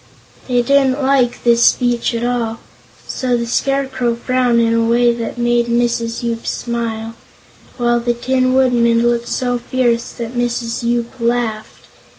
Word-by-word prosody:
They 245 -2 +1
didn't 275 +1 +2
like 265 -3 +1
this 235 0 +4
speech 240 -1 +2
at 230 - -2
all, 235 -2 -2 0.5
so 250 -2 -1
the 235 - -2
Scarecrow 265 -1 -1
frowned 250 0 +1
in 230 0 +2
a 230 0 +2
way 235 +1 +3
that 235 0 -5
made 240 0 +1
Mrs. 235 0 -1
Yoop 230 -1 -3
smile, 230 -1 -3 0.6
while 240 -1 +1
the 240 0 -1
Tin 255 +1 0
Woodman 235 -3 +3
looked 235 0 0
so 245 -1 -1
fierce 240 -1 0
that 235 0 -6
Mrs. 240 -1 -2
Yoop 235 0 -1
laughed. 230 -2 -2
240 Hz, 150 wpm, -17 LUFS, 235-245 Hz, 0.6 s, this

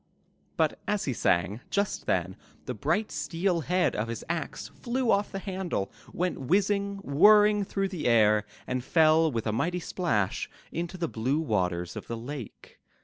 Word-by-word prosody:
*' - - -41 0.2
But - - +1
as 210 -1 0
he 135 - -1
sang, 90 0 +1
just 200 0 -1
then - - 0 0.3
the - - -3
bright 215 +1 0
steel 165 +4 -1
head 180 +4 +1
of 105 +2 -1
his 115 0 -5
axe 170 -2 -4
flew 245 -1 -1
off 200 +1 +1
the - - -4
handle, 185 - -3 0.2
went 180 -4 -2
whizzing, 200 +6 +1
whirring 210 +7 +6
through 195 0 -2
the 180 -8 -3
air, 105 -3 +5 0.2
and 130 -1 -2
fell 160 +2 +4
with 115 -3 -2
a 110 - 0
mighty 175 +10 0
splash 115 - -1 0.2
into 170 +3 -4
the 170 -2 -1
blue 130 +4 -1
waters 90 - -1
of - - -7
the 115 - -4
lake. 125 0 -8
160 Hz, 170 wpm, -28 LUFS, 115-195 Hz, 0.3 s, whirring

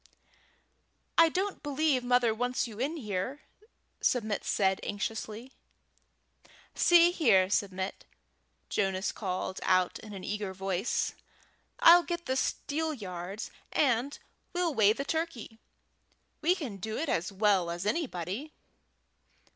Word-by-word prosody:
"I 330 0 +7
don't 380 +4 -2
believe 290 -2 +1
mother 245 -2 +3
wants 245 +2 -1
you 220 -2 -10
in 280 -2 -3
there," 205 +9 -3 0.6
Submit 220 -4 0
said 190 -1 +1
anxiously. 220 +4 -4 1.2
"See 345 0 +6
here, 210 - +3
Submit," 190 -1 -2 0.6
Jonas 195 -1 0
called 185 -2 -4
out 185 -1 +2
in 215 -1 -10
an 190 -2 -8
eager 205 -2 -3
voice, 190 +2 -1 0.7
"I'll 350 -8 +9
get 345 0 -4
the 260 - 0
steelyards, 215 - -3 0.2
and 260 0 +1 0.4
we'll 350 -3 0
weigh 215 -4 +5
the 275 +4 -4
turkey. 320 -9 -3 0.8
We 345 +4 +3
can 270 - -6
do 220 +3 -4
it 320 - -2
as 175 -6 -1
well 195 -3 +2
as 175 +2 -4
anybody." 235 - -2
225 Hz, 115 wpm, -30 LUFS, 195-295 Hz, 1.2 s, I'll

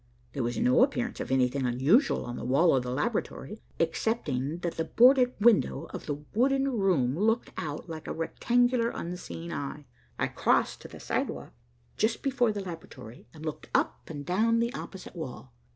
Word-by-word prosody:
There 140 - -2
was 120 0 -2
no 250 +1 +4
appearance 245 -3 -1
of - - -4
anything 130 +1 +2
unusual 130 - +3
on 120 0 -5
the - - -6
wall 140 +6 +4
of 130 - +2
the 125 - -5
laboratory, 210 - -3 0.2
excepting 160 - -1
that 170 -1 -2
the 165 - -2
boarded 250 +1 +5
window 225 0 +4
of - - -7
the 145 -1 -4
wooden 270 +4 +2
room 180 - +2
looked 225 +6 +1
out 150 +1 -5
like 160 -2 -7
a - - -3
rectangular 240 +8 +1
unseeing 170 -3 -6
eye. 145 +1 -5 0.3
I - - +1
crossed - - +1
to - - -9
the - - -12
sidewalk - - -3 0.4
just 220 +2 0
before 245 -4 +2
the 205 -1 -4
laboratory, 165 - -9
and 155 +2 -10
looked 155 - -5
up - - 0
and 145 -3 -6
down 220 +6 +2
the 235 +2 0
opposite 190 -9 -8
wall. 130 -6 -7
175 Hz, 175 wpm, -29 LUFS, 140-235 Hz, 0.4 s, boarded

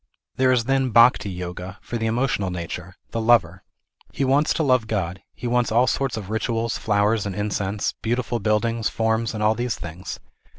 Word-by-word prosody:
There 130 0 +3
is 125 -2 +3
then 135 +1 +1
Bhakti 115 -2 +5
Yoga, 90 +1 -6
for 120 - -5
the 115 0 -1
emotional 115 -4 0
nature, 90 +1 -6 0.2
the 115 - -2
lover. 100 -6 +3 0.5
He 135 - -1
wants 140 +4 +3
to 160 - +1
love 130 -5 +2
God, 95 -4 -2
he 125 - -8
wants 120 -1 +1
all 120 +3 +4
sorts 130 0 -1
of 105 -1 -6
rituals, 115 +1 -1
flowers, 105 0 +1
and 95 - -4
incense, 105 0 -1
beautiful 120 +1 -1
buildings, 110 +2 +1
forms 110 0 0
and 105 - -2
all 105 +1 +4
these 120 0 -2
things. 85 +2 -7
110 Hz, 180 wpm, -23 LUFS, 100-120 Hz, 0.5 s, Bhakti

